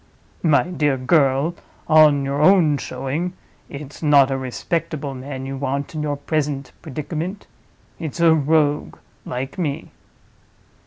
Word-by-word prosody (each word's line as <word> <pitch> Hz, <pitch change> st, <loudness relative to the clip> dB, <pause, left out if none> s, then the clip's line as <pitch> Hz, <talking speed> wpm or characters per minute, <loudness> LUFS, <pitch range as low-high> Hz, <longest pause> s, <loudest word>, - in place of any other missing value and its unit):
My 155 Hz, -4 st, +4 dB
dear 150 Hz, -5 st, 0 dB
girl, 135 Hz, +3 st, +2 dB, 0.3 s
on 155 Hz, -3 st, +5 dB
your 140 Hz, +1 st, -1 dB
own 155 Hz, -4 st, +5 dB
showing, 140 Hz, +8 st, -3 dB, 0.4 s
it's 145 Hz, 0 st, -9 dB
not 145 Hz, -3 st, +5 dB
a 135 Hz, -, 0 dB
respectable 150 Hz, +2 st, -3 dB
man 130 Hz, 0 st, -6 dB
you 135 Hz, 0 st, -5 dB
want 140 Hz, +2 st, -3 dB
in 155 Hz, -, -3 dB
your 145 Hz, -1 st, -2 dB
present 145 Hz, -1 st, -2 dB
predicament. 160 Hz, +6 st, -5 dB, 0.5 s
It's 160 Hz, 0 st, -5 dB
a 165 Hz, -1 st, +6 dB
Rogue—like 145 Hz, -3 st, -1 dB
me." 145 Hz, -5 st, -3 dB
145 Hz, 120 wpm, -21 LUFS, 135-160 Hz, 0.5 s, a